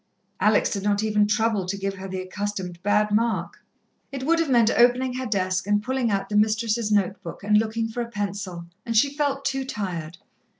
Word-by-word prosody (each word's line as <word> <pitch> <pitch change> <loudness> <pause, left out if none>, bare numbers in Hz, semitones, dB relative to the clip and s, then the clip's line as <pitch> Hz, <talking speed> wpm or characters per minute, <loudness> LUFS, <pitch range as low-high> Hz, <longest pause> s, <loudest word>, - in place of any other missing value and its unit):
Alex 210 0 +3
did 200 - -2
not 205 +1 +1
even 210 -1 +2
trouble 215 -2 +1
to 200 +2 -2
give 195 0 -2
her 190 0 -8
the 190 0 -4
accustomed 185 -2 -5
bad 210 +1 +2
mark. 225 +2 -1 0.5
It 270 -1 -5
would 330 +2 +3
have 330 -3 0
meant 235 -3 +4
opening 250 +2 +3
her 255 0 -3
desk, 185 -2 -1
and 205 0 +2
pulling 255 0 0
out 195 -2 -1
the 210 - -4
mistress's 215 +1 +1
note 200 -2 +1
book, 165 - -9
and 210 +1 +2
looking 225 +1 -1
for 225 +2 -4
a 235 - -4
pencil, 200 -5 -4 0.2
and 230 -1 -1
she 280 +5 +4
felt 280 -2 -1
too 270 0 0
tired. 175 - -5
210 Hz, 205 wpm, -24 LUFS, 195-235 Hz, 0.5 s, meant